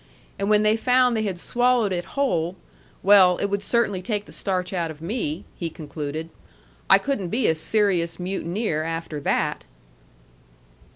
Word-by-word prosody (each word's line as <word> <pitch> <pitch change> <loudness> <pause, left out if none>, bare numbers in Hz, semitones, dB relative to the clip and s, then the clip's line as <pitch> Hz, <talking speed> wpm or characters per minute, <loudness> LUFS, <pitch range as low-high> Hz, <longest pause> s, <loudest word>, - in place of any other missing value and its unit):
And 200 +1 -1
when 210 0 +4
they 215 +1 +4
found 250 +1 +3
they 220 - 0
had 195 -4 -2
swallowed 240 0 +2
it 175 -1 -3
whole 175 -11 0 0.5
well, 190 -2 +6
it 200 - -2
would 200 0 0
certainly 205 -3 0
take 205 +1 -3
the - - -14
starch 185 -1 -2
out 170 -3 -1
of 155 -2 -9
me," 165 -3 -3
he 170 - -4
concluded. 155 +1 -6 0.6
"I - - +9
couldn't 240 -11 -2
be 235 +5 0
a - - +4
serious 170 0 0
mutineer 180 -1 -2
after 165 -1 -4
that." - - -1
190 Hz, 160 wpm, -24 LUFS, 165-215 Hz, 0.6 s, I